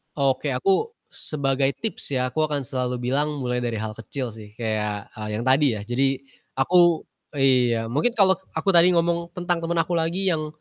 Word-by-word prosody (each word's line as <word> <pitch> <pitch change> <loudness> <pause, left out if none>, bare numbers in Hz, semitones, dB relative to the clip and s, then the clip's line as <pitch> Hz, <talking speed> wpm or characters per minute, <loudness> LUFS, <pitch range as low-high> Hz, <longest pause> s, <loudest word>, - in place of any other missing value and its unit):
Oke. 135 -1 +1
Aku 195 - +1 0.2
sebagai 135 -2 0
tips 225 -9 -1
ya, 130 0 +1
aku 155 - +1
akan 145 -2 -1
selalu 125 -2 -2
bilang 145 +1 0
mulai 125 -1 -1
dari 120 -1 -2
hal 110 0 -3
kecil 125 +2 -5
sih. 105 -1 -12
Kayak, 105 -2 -3
eee, 105 -2 -6
yang - - -3
tadi 135 +3 +5
ya, 105 - -5
jadi 135 +2 +1 0.4
aku 175 +4 +4 0.3
iya, 125 -4 +3
mungkin 150 - +2
kalau 190 -3 +5 0.2
aku 200 - 0
tadi 170 +2 +7
ngomong 170 0 0
tentang 175 -1 -1
temen 170 +1 -1
aku 170 +2 0
lagi 170 +4 0
yang, 155 -2 -1
140 Hz, 180 wpm, -24 LUFS, 125-170 Hz, 0.4 s, tadi